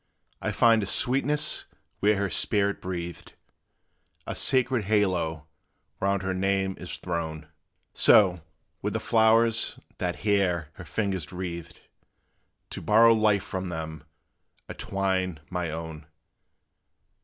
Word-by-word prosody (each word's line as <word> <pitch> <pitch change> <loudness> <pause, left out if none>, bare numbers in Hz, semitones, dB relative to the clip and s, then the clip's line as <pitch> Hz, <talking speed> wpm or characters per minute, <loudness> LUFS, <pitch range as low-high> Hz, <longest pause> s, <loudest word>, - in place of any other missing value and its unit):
I - - -1
find 115 -2 +4
a 100 - -3
sweetness 135 +7 +1 0.3
where 105 +1 +3
her 100 -2 -1
spirit 100 +3 0
breathed: 85 -2 -6 0.9
A - - -4
sacred 130 -4 +1
halo 90 -7 0 0.5
round 100 0 0
her 95 0 -1
name 95 0 0
is 90 - -6
thrown; 80 -3 -4 0.5
So, 90 -5 +5 0.4
with - - -2
the - - -1
flowers 115 0 +3 0.2
that 90 -1 -1
here 90 -6 +1
her 90 - -11
fingers 95 -1 -2
wreathed 85 -2 -6 0.9
To - - -6
borrow 115 +2 +6
life 105 -3 +2
from 95 -2 -4
them, 80 -2 -6 0.6
I - - -6
twine 95 -4 -2
my 90 -2 -2
own. 80 -1 -7
95 Hz, 120 wpm, -27 LUFS, 85-105 Hz, 0.9 s, borrow